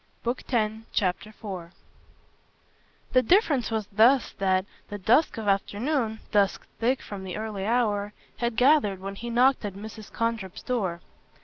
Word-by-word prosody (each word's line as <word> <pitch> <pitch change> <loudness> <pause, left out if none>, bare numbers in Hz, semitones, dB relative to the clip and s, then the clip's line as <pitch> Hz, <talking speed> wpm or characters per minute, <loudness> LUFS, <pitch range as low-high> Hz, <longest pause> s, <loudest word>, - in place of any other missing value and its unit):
Book 240 +2 -1
Tenth, 220 -2 -1
Chapter 195 +1 -1
4 185 -5 -8 1.4
The 255 - +6
difference 290 - +3
was 220 -2 -1
thus 235 +6 +4
that 190 -1 +2 0.2
the 205 - -5
dusk 235 - +3
of 220 -2 -4
afternoon 220 +4 0
dusk 200 -2 +2
thick 250 +3 +1
from 195 -2 -7
an 180 - -4
early 210 -2 -4
hour 210 -4 +1 0.3
had 235 -1 -1
gathered 250 -7 +4
when 195 +1 -5
he 235 +4 -6
knocked 250 +3 +3
at 200 -2 -4
Mrs. 215 +1 -9
Condrip's 230 -5 -3
door. 190 -9 -1
220 Hz, 145 wpm, -26 LUFS, 195-240 Hz, 1.4 s, The